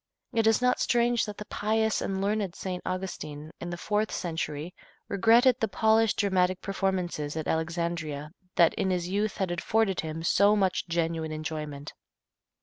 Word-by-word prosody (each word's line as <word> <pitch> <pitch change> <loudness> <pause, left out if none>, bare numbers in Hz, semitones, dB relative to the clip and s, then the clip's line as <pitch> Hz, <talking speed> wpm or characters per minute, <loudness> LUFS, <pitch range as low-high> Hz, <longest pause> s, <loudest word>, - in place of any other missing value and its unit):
It 225 -1 +2
is 225 +2 +3
not 250 0 +3
strange 240 -1 +2
that 210 -2 -7
the 210 - -7
pious 220 +1 0
and 195 0 -2
learned 200 -3 -1
St. 180 -2 -4
Augustine, 160 -5 -5
in 175 - -5
the 175 - -4
fourth 210 +4 0
century, 160 -1 -3 0.3
regretted 230 +5 +4
the 225 - +1
polished 220 +1 +3
dramatic 185 -2 +2
performances 185 -6 -2
at 155 - -3
Alexandria 160 -2 -2 0.2
that 170 -1 +5
in 190 - -1
his 180 -1 -1
youth 205 +3 -1
had 190 -4 -1
afforded 195 +2 +1
him 160 0 -4
so 200 +4 +4
much 190 -3 +1
genuine 165 -1 -1
enjoyment. 155 -2 -5
185 Hz, 155 wpm, -28 LUFS, 165-210 Hz, 0.3 s, that